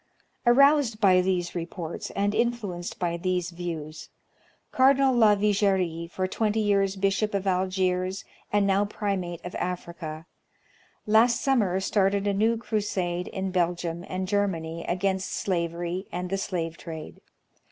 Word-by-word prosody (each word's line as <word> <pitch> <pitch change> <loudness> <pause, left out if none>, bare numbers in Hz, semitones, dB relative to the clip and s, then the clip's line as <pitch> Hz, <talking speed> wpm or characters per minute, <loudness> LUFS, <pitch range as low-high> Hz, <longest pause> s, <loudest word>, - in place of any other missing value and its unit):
Aroused 275 -2 +5
by 185 -4 +5
these 180 -2 -1
reports, 170 -1 -5
and 205 +1 +1
influenced 215 -6 -2
by 170 -1 -1
these 180 0 -1
views. 165 -3 -6 0.6
Cardinal 265 0 +4
Lavigerie, 200 -6 +2
for 185 - -1
twenty 215 +2 0
years 200 -2 +2
Bishop 195 +2 0
of 200 0 -1
Algiers 185 0 0 0.3
and 205 -1 +3
now 195 +1 +3
Primate 195 -5 -3
of 180 - -6
Africa, 170 -3 -5 0.8
last 225 +3 +4
summer 210 -9 +2
started 195 0 +1
a 200 - +1
new 220 +3 +2
crusade 195 -6 -2
in 190 -1 -3
Belgium 175 -1 -1
and 185 0 -3
Germany 170 -5 -1
against 190 +1 -1
slavery 175 0 -2
and 180 +1 -4
the 195 - +1
slave 170 -4 -3
trade. 160 -2 -8
190 Hz, 130 wpm, -26 LUFS, 175-205 Hz, 0.8 s, Aroused